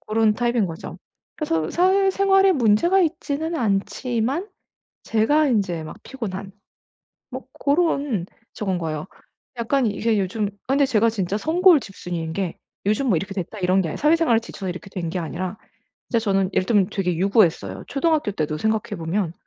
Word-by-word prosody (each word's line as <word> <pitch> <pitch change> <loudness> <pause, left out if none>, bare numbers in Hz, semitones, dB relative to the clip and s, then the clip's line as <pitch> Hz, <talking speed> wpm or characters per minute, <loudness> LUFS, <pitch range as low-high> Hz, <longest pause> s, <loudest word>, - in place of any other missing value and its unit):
고런 215 0 +2
타입인거죠. 230 -8 -2 0.4
그래서 165 - -1
사회생활에 385 +1 +4
문제가 265 - +3
있지는 320 -1 -1
않지만 240 - -1 0.6
제가 290 +8 +3
인제 195 -9 0
막 - - -9
피곤한 200 -7 -6 0.8
뭐 - - -7
고런 280 - 0 0.3
저건 190 -4 -2
거예요. 155 -1 -4 0.5
약간 245 +2 +1
이게 215 +1 0
요즘 195 +3 -2
아니 200 - -1 0.3
근데 280 - +4
제가 230 -1 +3
진짜 200 -2 -2
성골 335 - +5
집순이인 175 -6 -5
게 185 -1 -3 0.3
"요즘 230 +6 +1
뭐 190 - +3
이렇게 195 +4 -3
됐다." 200 +3 -5
이런게 185 -1 +2
아니라 - - -5
사회생활에 305 -5 +3
지쳐서 195 -4 -7
이렇게 180 +2 -6
된 175 -4 -4
게 180 - -3
아니라 180 +3 -4 0.5
진짜 230 -2 +1
저는 195 -2 +1
예를 - - +2
들면 200 -4 +3
되게 180 -4 -1
유구했어요. 170 - +2
초등학교 300 -5 +1
때도 155 -3 -2
생각해 220 0 -1
보면 170 +1 -1
215 Hz, 360 characters per minute, -23 LUFS, 185-280 Hz, 0.8 s, 성골